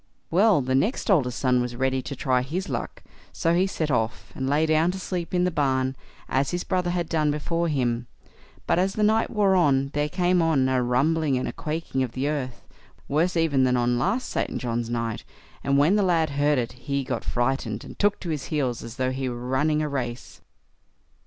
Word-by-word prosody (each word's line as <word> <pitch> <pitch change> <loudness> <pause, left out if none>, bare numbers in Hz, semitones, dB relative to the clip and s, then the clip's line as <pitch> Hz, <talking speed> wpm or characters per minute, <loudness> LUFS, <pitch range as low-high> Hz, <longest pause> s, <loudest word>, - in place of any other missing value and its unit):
Well, 195 -1 +4
the 130 +1 -1
next 205 - +1
oldest 125 -10 +2
son 125 -2 +2
was 120 0 -3
ready 130 +1 0
to 130 +2 -6
try 130 -1 +1
his 175 +9 -4
luck, - - -4 0.3
so 165 -2 0
he 185 +3 +3
set 160 -5 -2
off, 115 -1 -1
and 130 0 -3
lay 150 +3 +3
down 155 +2 +3
to 190 +1 -3
sleep 180 -2 -4
in 180 -1 +2
the 180 - +1
barn 130 -3 0 0.3
as 135 +1 +1
his 175 0 -2
brother 180 -2 0
had 175 -1 -1
done 155 -2 +1
before 165 +3 -1
him; 120 -5 -1 0.6
but - - +2
as 190 +1 +1
the 215 - 0
night 220 +2 +3
wore 205 -3 +2
on, 140 -6 +3
there 150 0 0
came 180 +1 +2
on 155 -5 +2
a 130 -1 +2
rumbling 140 +4 +1
and 125 - -3
quaking 155 -3 -3
of 125 -3 -2
the 135 +2 -1
earth, 130 -5 -3 0.4
worse 170 +5 +1
even 150 -5 +2
than 125 -1 +3
on 120 0 +2
the 120 - 0
last 205 - 0
St. - - -2
John's 120 -2 -2
night, 115 -2 -2 0.4
and 140 0 +2
when 155 +9 +4
the - - +3
lad 165 -5 +2
heard 145 +1 +2
it, 120 -2 -1
he 135 +3 -3
got 130 -1 -3
frightened, 120 -3 -1
and - - -11
took 205 0 +2
to 175 - -5
his 150 -4 -3
heels 130 -6 -1
as 115 0 -8
though 130 0 0
he 130 0 -2
were 120 0 -6
running 150 +4 +1
a - - -1
race. 125 -4 -5
140 Hz, 215 wpm, -25 LUFS, 130-170 Hz, 0.6 s, Well